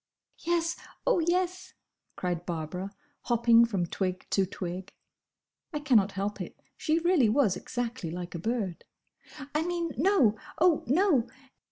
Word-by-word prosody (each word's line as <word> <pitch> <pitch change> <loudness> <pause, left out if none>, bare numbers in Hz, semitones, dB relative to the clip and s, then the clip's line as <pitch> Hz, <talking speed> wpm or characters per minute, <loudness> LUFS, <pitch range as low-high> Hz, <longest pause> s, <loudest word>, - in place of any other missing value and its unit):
"Yes! 335 0 0 0.3
oh, - - +3
yes!" 360 +2 -1 0.4
cried 175 -2 -2
Barbara, 175 +3 -4 0.4
hopping 235 -1 +5
from 195 -6 -1
twig 185 +1 -3
to 195 -1 +2
twig. 185 0 -6 0.8
(I 300 - -2
cannot 225 -9 +3
help 200 +2 -3
it: - - -7 0.2
she 315 -1 +1
really 335 -8 +4
was 220 -5 +3
exactly 240 -6 -4
like 175 +1 -6
a 170 - -4
bird!) 210 -3 -2 0.7
"I 300 - +2
mean, 340 -1 -1
No! 275 - +3 0.2
oh, 330 -1 +4
no!" 285 - +3
235 Hz, 135 wpm, -29 LUFS, -, 0.8 s, hopping